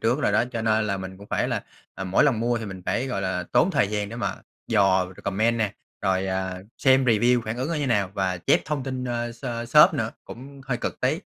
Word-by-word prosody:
trước 120 +6 +1
rồi - - +1
đó, - - +3
cho 115 -2 -2
nên 110 -1 +2
là 100 - -1
mình 95 0 -7
cũng 100 - -12
phải - - 0
là, - - -2 0.3
à, 95 - -5
mỗi 95 +11 +3
lần 125 -6 +2
mua 120 +1 +1
thì 110 - -6
mình 95 -2 -8
phải, 130 +3 0
gọi 110 -7 -2
là, 90 -1 -1
tốn 185 - +4
thời 140 - +2
gian 105 -1 -2
để 115 - -7
mà 120 - -2 0.3
dò 95 -4 +3
c - - -15
comment 110 +4 +1
nè, 105 -3 -1 0.3
rồi, 95 0 +1
à, 95 -1 -2 0.2
xem 130 -1 +4
review 120 +1 +3
phản 110 +2 -3
ứng 130 +5 -2
nó 170 - -1
như 145 -2 -1
nào 100 -6 +1
và 95 -2 0
chép - - +3
thông 150 -3 -2
tin, 130 -1 -4
ơ, 120 -1 -2
s 120 - -15 0.2
shop 155 +5 +7
nữa, 115 -6 -1
cũng 135 +3 -11
hơi 130 -2 -1
cực - - -4
tí. 140 +7 +1
115 Hz, 260 wpm, -25 LUFS, 100-130 Hz, 0.3 s, shop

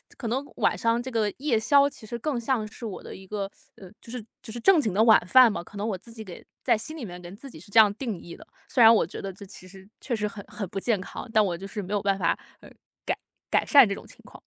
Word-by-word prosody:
可 235 - -5
能 265 +5 -1
晚 - - +1
上 230 0 +1
这 260 - -6
个 220 -3 +1
夜 265 -6 +1
宵 280 +5 +4
其 230 - -13
实 235 - -4
更 265 0 -2
像 235 -2 0
是 220 +2 -9
我 205 -4 -6
的 - - -9
一 190 0 -12
个， 200 -1 -4 0.2
呃， 190 - -13
就 - - -15
是 240 -2 -6 0.2
就 220 - -9
是 240 - -5
正 375 +5 +6
经 215 -10 0
的 215 - +4
晚 225 -1 +7
饭 255 +1 +7
吧。 - - -4
可 175 - -15
能 200 +1 -3
我 215 -4 -2
自 230 +5 -14
己 220 -1 -8
给 185 -4 -11 0.2
在 - - +3
心 270 +9 -8
里 305 - -7
面， 180 -4 -8
跟 175 +2 -10
自 270 +6 -11
己 - - -12
是 - - -14
这 200 - 0
样 210 -2 +7
定 225 -4 -4
义 170 - -10
的， - - -15 0.2
虽 245 - +2
然 225 0 +9
我 220 - +3
觉 - - -8
得 195 -1 -5
这 200 +2 -11
其 185 -1 -13
实 190 +1 -14
确 245 - -2
实 210 -1 -2
很 205 0 -8
很 210 - -5
不 195 0 -4
健 210 -1 0
康， 230 - -8
但 215 -2 +5
我 175 -3 -2
就 195 +3 -8
是 205 +1 -5
没 195 +2 -6
有 205 - +1
办 195 -1 +1
法， 170 -4 +1 0.2
呃， - - -14 0.4
改 - - -1 0.3
改 - - +2
善 280 -6 +7
这 200 - -1
种 - - -9
情 - - -15
况。 - - -14
215 Hz, 320 characters per minute, -26 LUFS, 195-240 Hz, 0.4 s, 然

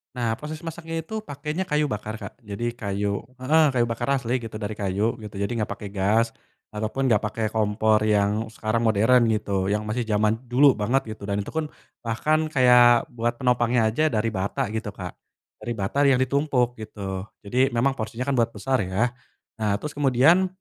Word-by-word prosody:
Nah 120 -2 0
posisi 155 +1 -7
masaknya 165 0 -5
itu 220 +7 -5
pakenya 150 0 -4
kayu 150 -1 +1
bakar 105 +1 -4
Kak 115 - -9
jadi 115 +1 -4
kayu 100 -3 -2 0.2
heeh, 150 +5 +3
kayu 120 - +4
bakar 115 0 -3
asli 125 -1 -1
gitu 115 -2 -8
dari 105 -1 -4
kayu 105 +1 0
gitu 105 -2 -9
jadi 100 +3 -2
nggak 105 - 0
pake 100 -2 -8
gas, 105 +4 +2 0.4
ataupun 110 +5 -1
gak 105 - +5
pake 105 +2 -3
kompor 110 0 +2
yang 105 +1 +1
sekarang 110 0 -2
modern 115 +3 +4
gitu 100 -3 0
yang 105 +2 0
masih 110 +2 -2
jaman 110 +1 +1
dulu 135 +4 +6
banget 120 +4 0
gitu 105 - -15
dan 100 0 -1
itu - - -8
pun, 160 -1 -2 0.3
bahkan 155 +8 0
kayak 125 -4 +6
buat 120 0 -1
penopangnya 120 -2 +2
aja 155 +8 +2
dari 115 -4 0
bata 100 0 -2
gitu 110 0 -3
Kak, 90 -3 -6 0.5
dari 120 - -5
bata 100 +6 -2
yang 135 - +5
ditumpuk 130 -3 +1
gitu 100 -2 -6 0.2
jadi 125 +6 +2
memang 130 +4 +3
porsinya 115 -1 -4
kan 140 +1 0
buat 115 -1 +1
besar 130 +5 0
ya, 105 +6 0 0.5
nah 105 -2 +1
terus 150 +8 -5
kemudian 145 +6 +4
115 Hz, 185 wpm, -24 LUFS, 105-130 Hz, 0.5 s, dulu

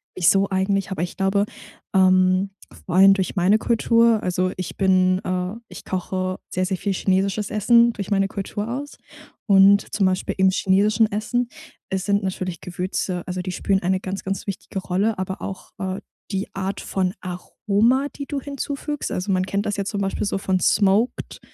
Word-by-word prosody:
wieso 195 +2 +3
eigentlich?” 195 +1 0
Aber 180 -3 -2
ich 175 - -5
glaube, 195 +1 +2 0.5
ähm, 185 0 +4 0.4
vor 180 - -2
allem 195 +1 +8
durch 190 -2 -2
meine 195 +3 +3
Kultur 230 -1 +3
also 185 0 0
ich 185 -2 -5
bin, 185 -1 +3
äh 185 +1 -2 0.2
ich - - -11
koche 185 0 -3
sehr, 185 0 -1
sehr 190 -1 -1
viel 200 +1 -1
chinesisches 195 +2 0
Essen 235 +3 +4
durch 200 0 -6
meine 195 -1 +2
Kultur 205 +2 -4
aus. 275 +5 -5 0.5
Und, 200 0 +5
zum 200 -3 +2
Beispiel 185 0 -1
im 190 0 +5
chinesischen 205 +4 +2
Essen 235 +4 -1 0.4
es 190 -1 -2
sind 200 0 +1
natürlich 185 -3 -3
Gewürze, 180 0 -3
also 180 0 -3
die 185 - -4
spielen 195 +2 0
eine 185 +1 +1
ganz, 195 +1 -5
ganz 195 +2 -4
wichtige 195 0 -5
Rolle, 195 +3 -1
aber 190 0 -4
auch, 190 -1 -7
äh, 190 -1 -3 0.3
die 195 0 -2
Art 195 +1 -3
von 185 -1 -1
Aroma, 210 +8 0
die 280 - -5
du 280 -1 -4
hinzufügst. 285 +1 -4
Also, 185 +2 -2
man 185 0 +1
kennt 200 +2 -2
das 205 0 -2
jetzt 200 0 -2
zum 200 - -2
Beispiel 195 +1 -1
so 200 - -1
von 190 -1 0
smoked 205 +6 +1
195 Hz, 180 wpm, -22 LUFS, 185-205 Hz, 0.5 s, allem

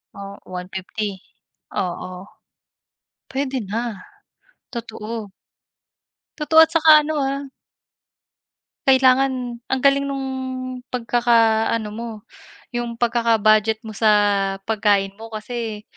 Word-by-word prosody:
Oh, 200 0 -8
150? 190 +2 -5 0.6
Oo. 185 +1 -4 1.1
Puwede 270 0 -1
na, 215 -1 -4 0.7
totoo. 225 -3 -6 1.1
Totoo 320 +1 +4
at 320 - +6
saka 315 -2 +7
ano, 310 +1 -3
ah 275 0 -2 1.4
kailangan 260 -2 +3
ang 265 -1 -1
galing 280 0 +4
nung 275 -1 -3 0.6
pagkakaano 230 -2 +2
mo, 230 +2 -6 0.6
yung 240 -1 -3
pagkaka-budget 225 -2 +2
mo 220 - -7
sa 215 +1 +3 0.5
pagkain 205 -2 +1
mo 225 - -8
kasi 220 -1 -5
230 Hz, 90 wpm, -21 LUFS, 215-260 Hz, 1.4 s, saka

